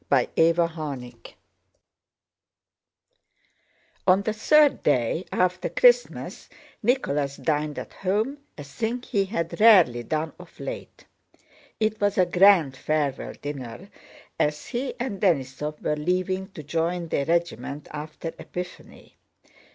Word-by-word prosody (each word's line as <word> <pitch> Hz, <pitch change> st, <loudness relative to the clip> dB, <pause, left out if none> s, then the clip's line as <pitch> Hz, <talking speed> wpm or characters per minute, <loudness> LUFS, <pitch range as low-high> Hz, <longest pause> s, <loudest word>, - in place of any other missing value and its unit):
CHAPTER 165 Hz, +1 st, +3 dB
XI 145 Hz, -7 st, -6 dB, 2.9 s
On 190 Hz, +2 st, +5 dB
the 215 Hz, -, -1 dB
third 295 Hz, +7 st, +4 dB
day 145 Hz, +5 st, +1 dB
after 180 Hz, 0 st, 0 dB
Christmas -, -, +2 dB, 0.3 s
Nicholas 150 Hz, -, 0 dB
dined 150 Hz, -1 st, -1 dB
at -, -, -7 dB
home, 215 Hz, +9 st, -1 dB, 0.2 s
a 145 Hz, -, -7 dB
thing 225 Hz, -, -3 dB
he 200 Hz, -4 st, 0 dB
had 175 Hz, -4 st, -3 dB
rarely 185 Hz, -, +6 dB
done 155 Hz, +6 st, -2 dB
of -, -, -15 dB
late. -, -, -7 dB, 0.7 s
It 215 Hz, -1 st, 0 dB
was 205 Hz, -1 st, +1 dB
a 185 Hz, -, +5 dB
grand 175 Hz, -6 st, +5 dB
farewell 145 Hz, -1 st, -1 dB
dinner, 145 Hz, -, -7 dB, 0.5 s
as 150 Hz, 0 st, 0 dB
he 255 Hz, +1 st, -3 dB
and 240 Hz, -6 st, -4 dB
Denísov 150 Hz, -4 st, 0 dB
were 150 Hz, -, +1 dB
leaving 185 Hz, +4 st, -1 dB
to 155 Hz, -, -8 dB
join 165 Hz, +3 st, -2 dB
their 140 Hz, -, -1 dB
regiment 165 Hz, -4 st, -1 dB
after 155 Hz, +2 st, -6 dB
Epiphany. 180 Hz, 0 st, -9 dB
170 Hz, 115 wpm, -25 LUFS, 150-200 Hz, 2.9 s, rarely